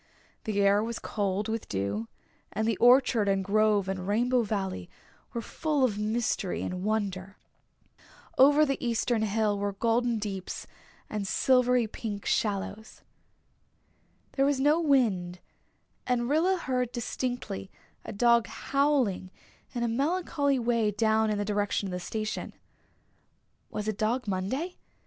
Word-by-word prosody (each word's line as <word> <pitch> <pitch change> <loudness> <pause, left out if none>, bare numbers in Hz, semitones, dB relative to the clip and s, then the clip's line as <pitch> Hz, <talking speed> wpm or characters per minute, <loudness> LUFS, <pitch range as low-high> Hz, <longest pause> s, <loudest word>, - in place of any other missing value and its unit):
The 210 -2 -1
air 200 +1 +4
was 230 0 -3
cold 205 0 -2
with 225 0 -4
dew 100 +3 -2 0.4
and 220 +2 -1
the 225 - +2
orchard 245 -4 +5
and 195 -1 +1
grove 210 -1 +2
and 190 -1 -3
Rainbow 245 +4 +2
Valley 195 - -3 0.4
were 235 - -4
full 300 +4 -1
of 210 -5 +1
mystery 215 -3 -1
and 180 0 -4
wonder. 200 -3 -2 1.0
Over 290 +3 +6
the 275 -2 -2
eastern 235 -1 0
hill 210 -1 +1
were 200 0 -1
golden 230 +3 +1
deeps 195 -3 -5 0.4
and 210 -2 -3
silvery 250 +1 +3
pink 210 -1 -6
shallows. 205 +1 -2 1.3
There 270 - +1
was 285 -2 +1
no 295 +4 +4
wind, 215 - +2 0.7
and 240 -1 +1
Rilla 335 +7 +2
heard 250 -7 -1
distinctly 240 -5 -4 0.3
a - - -7
dog 235 +2 +3
howling 275 -10 0 0.5
in 240 - -1
a - - +1
melancholy 285 +2 0
way 235 -3 +1
down 220 +1 +2
in 210 - 0
the 205 - -1
direction 205 -1 -1
of - - -5
the 180 - -3
station. 215 +4 -4 1.2
Was 210 0 -4
it 215 -2 -2
Dog 230 +2 0
Monday? 230 - -2
220 Hz, 135 wpm, -28 LUFS, 200-250 Hz, 1.3 s, Over